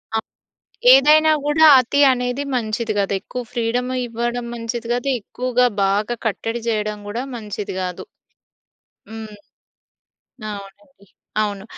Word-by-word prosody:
ఆ! - - +3 0.8
ఏదైనా 305 +3 +6
కూడా 305 +2 +4
అతి 255 +3 +1
అనేది 250 +2 -2
మంచిది 220 -1 -2
కాదు. 200 0 0
ఎక్కువ 250 - -6
ఫ్రీడమ్ 245 +1 -1 0.2
ఇవ్వడం 240 +1 -3
మంచిది 230 0 -5
కాదు. 245 +2 -2
ఎక్కువగా 250 +3 0 0.2
బాగా 210 +4 0
కట్టడి 225 +2 -3
చేయడం 210 -1 -2
కూడా 235 +5 -3
మంచిది 210 -3 -6
కాదు. 180 -1 -5 1.0
హ్మ్. 220 -1 -8 1.2
అవునండి. 200 +5 -11 0.4
అవును. 200 -2 -3
235 Hz, 110 wpm, -20 LUFS, 210-250 Hz, 1.2 s, ఏదైనా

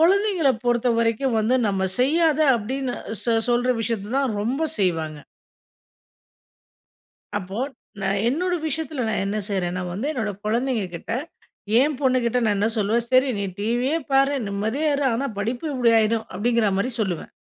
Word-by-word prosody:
கொழந்தைங்கள 375 -3 +4
பொறுத்த 240 0 +2
வரைக்கும், 230 +2 +1
வந்து 220 +4 +2
நம்ம 190 -1 0
செய்யாத 310 +3 +3 0.2
அப்டின்னு 255 +4 -3 0.3
சொ 235 - +2 0.2
சொல்ற 245 +1 +2
விஷயத்த 225 -1 -3
தான் 265 -6 0
ரொம்ப 255 +9 -1 0.2
செய்வாங்க. 160 -5 -1 2.2
அப்போ, 190 +1 -6 0.4
நான் 195 +1 0
என்னோட 355 +8 0
விஷயத்தில 305 -3 -3
நான் 215 -2 0
என்ன 205 +2 -2
செய்றேன்னா 180 -2 -1
வந்து, 210 +9 -3
என்னோட 225 -8 -2
கொழந்தைங்க 235 -1 0
கிட்ட, 170 - -7 0.7
என் 290 +1 +2
பொண்ணுகிட்ட 250 -3 +2
நான் 210 -2 +2
என்ன 210 +2 +2
சொல்லுவேன்? 220 +3 +1
"சரி 255 +1 +4
நீ 200 - -1
டிவியே 245 +9 0
பாரு. 275 +1 +4
நிம்மதியா 220 +10 -1
இரு. 285 0 0
ஆனா, 265 +5 -1
படிப்பு 240 +8 -2
இப்டி 240 -3 +3
ஆயிரும்" 220 +1 0
அப்டிங்கிற 230 0 +2
மாரி 245 +6 0
சொல்லுவேன். 185 -6 -2
235 Hz, 145 wpm, -23 LUFS, 205-270 Hz, 2.2 s, கொழந்தைங்கள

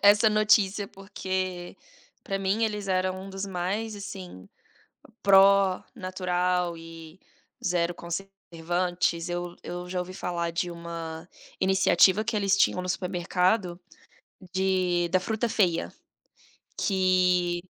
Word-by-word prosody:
essa 205 +2 +6
notícia, 210 -1 +3
porque 185 -2 -4 0.5
para 195 - -3
mim 195 +4 +1
eles 210 -2 -3
eram 185 0 0
um 195 - -9
dos 195 +1 -4
mais 195 +4 -3
assim, 190 - -9 0.8
pró 195 -1 +5
natural 180 -3 -1
e 165 +1 -12 0.4
zero 175 -1 +1
conservantes, 175 -1 -2
eu 175 0 -4
eu 175 0 -6
já 180 0 -2
ouvi 180 +1 -5
falar 170 -2 -3
de 170 +1 -2
uma 170 -1 -7 0.3
iniciativa 190 +1 +4
que 220 - -2
eles 200 -1 +2
tinham 180 - +3
no 180 - -5
supermercado, 180 0 0 0.7
de 185 -2 +1
da 185 - +3
fruta 220 +5 -1
feia, 180 -7 +1 0.8
que 180 -2 +2
185 Hz, 115 wpm, -27 LUFS, 175-195 Hz, 0.8 s, essa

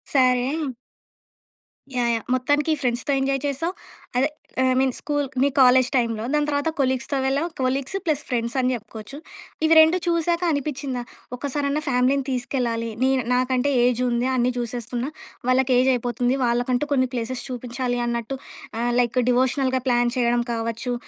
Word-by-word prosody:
సరే! 255 -2 +4 1.6
Yeah! 240 -1 +2
Yeah! 225 - -5
మొత్తానికి 290 +5 +1
ఫ్రెండ్స్‌తో 245 +2 -1
ఎంజాయ్ 270 0 0
చేసావు. 330 +6 -2 0.4
అదే 270 +4 +3 0.4
I - - +3
mean 265 0 +2
school 290 -1 -1 0.2
me 275 - +5
college 255 0 +6
టైమ్‌లో, 230 -3 0
దాని 295 0 +2
తర్వాత 285 +2 0
కొలీగ్స్‌తో 260 +1 0
వెళ్ళావు. 280 +5 +1
Colleagues 265 +7 -1
plus 305 -3 +1
ఫ్రెండ్సని 250 +1 0
జెప్పుకోవచ్చు. 220 +4 -9 0.5
ఇవి 325 - +5
రెండు 320 +3 +4
చూసాక 340 0 +1
అనిపించిందా 280 -3 -2 0.4
ఒక్కసారన్నా 285 +2 -1
ఫ్యామిలీని 260 +2 +2
తీసుకెళ్లాలి. 240 -2 -1
నే 265 - +4 0.2
నాకంటే 255 +2 +1
ఏజుంది 245 0 +1
అన్నీ 250 0 +2
జూసేస్తున్నా, 240 +2 -3 0.4
వాళ్ళకి 255 0 +3
ఏజయిపోతుంది, 250 0 +1
వాళ్ళకంటూ 245 +4 0
కొన్ని 260 -2 +2
ప్లేసెస్ 240 +2 -3
చూపించాలి 245 0 -3
అన్నట్టు, 235 +2 -3 0.4
ఆహ్, 240 0 0
లైక్ 245 0 +1
డివోషనల్‌గా 260 +1 +1
ప్లాన్ 240 0 +2
చేయడం 240 -1 +2
కావచ్చు, 230 +2 -2
255 Hz, 135 wpm, -23 LUFS, 240-275 Hz, 1.6 s, college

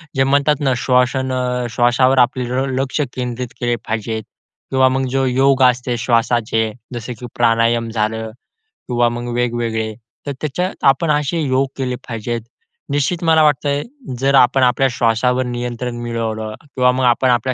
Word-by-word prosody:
जे 135 - +3
म्हणतात 140 +2 +3
ना, 135 -2 +2
श्वास 125 +1 +2 0.6
श्वासावर 125 +2 +3
आपले 125 +1 -2
ल 130 +2 0
लक्ष 135 +3 -1
केंद्रित 125 0 -3
केले 120 -1 0
पाहिजे 110 0 -2
किंवा 130 +5 -2
मग 130 0 0
जो 135 0 +2
योग 135 +1 +2
असते 125 -1 +2
श्वासाचे 115 -1 +1 0.2
जसं, 120 +1 -5
की 125 - -7
प्राणायाम 115 0 +2
झालं 110 0 -2 0.6
किंवा 120 -1 +2
मग 120 0 -5
वेगवेगळे 115 -2 -1 0.3
तर - - -1
त्याच्यात 180 +5 -3
आपण 140 +4 +4
असे 150 +3 0
योग 135 -1 +1
केले 125 -2 -2
पाहिजेत. 115 0 -3 0.5
निश्चित 145 +5 0
मला 160 -1 +5
वाटतंय, 145 0 +1 0.4
जर 135 +1 +2
आपण 130 0 +5
आपल्या 125 +2 +3
श्वासावर 125 +2 +1
नियंत्रण 120 0 -4
मिळवलं 110 -2 -3
किंवा 125 -3 +1
मग 130 0 -1
आपण 125 +1 +3
आपल्या 125 +2 +1
125 Hz, 150 wpm, -18 LUFS, 120-135 Hz, 0.6 s, मला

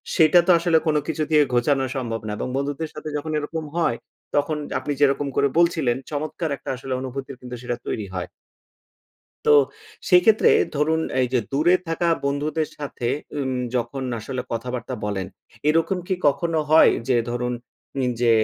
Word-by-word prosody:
সেটা 170 +1 +6
তো 185 - +7
আসলে 170 -1 +3
কোন 155 - +2
কিছু 160 -1 -1
দিয়ে 150 -1 +6
ঘোচানো 135 +3 +2
সম্ভব 115 -3 -3
না - - -3
এবং - - -3
বন্ধুদের 145 +3 -2
সাথে 150 0 -6
যখন 155 +2 -4
এরকম 155 +2 -3
হয়, 165 -9 +1 0.4
তখন 150 +1 +1 0.2
আপনি 145 +2 -3
যেরকম 140 0 +3
করে 140 - +3
বলছিলেন, 160 -8 +3 0.2
চমৎকার 155 +2 -3
একটা - - -9
আসলে 130 +1 -5
অনুভূতির 130 0 -6
কিন্তু 125 0 -7
সেটা 125 -1 -2
তৈরি 105 - -2
হয়। 90 -1 -4 1.2
তো - - +5 0.6
সেক্ষেত্রে 185 +5 +6 0.3
ধরুন, 160 +2 +2 0.2
এই 125 - +3
যে 125 - +4
দূরে 160 +6 +4
থাকা 165 +1 0 0.2
বন্ধুদের 150 +3 -1
সাথে 140 -5 -4 0.3
উম 130 -2 -1 0.2
যখন 125 +3 -2 0.2
আসলে 130 +2 -4
কথাবার্তা 125 +2 -4
বলেন, 95 -3 -2 0.4
এরকম 165 +4 +2
কি 190 - +2
কখনো 165 +3 +1
হয় 160 - +7 0.2
যে 125 - +4
ধরুন, 125 +1 -2 0.5
উম 125 -1 +1
যে 120 - +4
145 Hz, 165 wpm, -23 LUFS, 125-160 Hz, 1.2 s, তো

